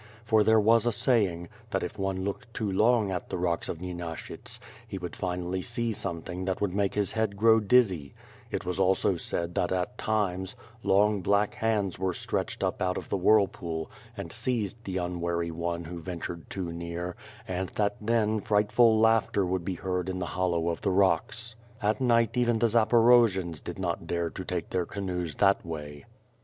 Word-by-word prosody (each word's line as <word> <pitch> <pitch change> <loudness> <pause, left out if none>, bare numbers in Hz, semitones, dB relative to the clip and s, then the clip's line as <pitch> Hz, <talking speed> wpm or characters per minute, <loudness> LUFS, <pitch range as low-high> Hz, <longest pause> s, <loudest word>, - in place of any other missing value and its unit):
For 110 -1 +4
there 110 +1 +5
was 115 +2 +4
a - - +3
saying, 105 -8 +1 0.2
that - - -1
if - - -6
one 95 -1 -1
looked 100 +4 -4
too 105 -3 -1
long 110 +1 +3
at 90 - -4
the - - -2
rocks 85 -1 -1
of 80 - -4
Nyenashyts, 85 -2 -6 0.3
he 95 - -5
would 90 -2 -6
finally 90 0 -2
see 115 +2 -2
something 90 -1 -5
that 95 -1 -1
would 100 -3 -1
make 100 -1 0
his 105 -1 0
head 110 -3 -1
grow 110 +2 +6
dizzy; 100 - +2 0.3
it - - -3
was 90 +1 -2
also 95 0 +3
said 85 0 -3
that 90 - 0
at 95 +7 -2
times, 95 -4 -1 0.3
long 105 0 +3
black 100 +3 +2
hands 105 -5 0
were 95 -2 -1
stretched - - -1
up - - -1
out 90 0 0
of - - -6
the - - 0
whirl 100 +2 +5
pool, 80 -4 -5 0.3
and - - -6
seized 115 -3 -2
the 95 -1 -3
unwary 85 -1 -2
one 85 +1 -3
who 85 +1 -7
ventured 85 -2 -6
too 90 -3 -4
near, 85 +1 -5 0.3
and 95 0 -2
that 105 -1 0
then, 110 -1 +1
frightful 110 +2 +4
laughter 110 -3 +3
would 90 0 -1
be 95 +1 -3
heard 90 0 -2
in 95 - -3
the 90 - -2
hollow 85 -2 +1
of 85 - -3
the 100 - +1
rocks. 100 +5 +1 0.2
At 105 +4 0
night 115 -3 +3
even 120 -2 +2
the 115 +1 +2
Zaporojians 115 -7 +4
did - - -6
not 85 -3 -3
dare 85 -1 -1
to 95 - -6
take 90 -2 -4
their 90 -2 0
canoes 90 -5 -3
that 100 -1 +3
way. 75 -3 -7
95 Hz, 190 wpm, -28 LUFS, 90-110 Hz, 0.3 s, grow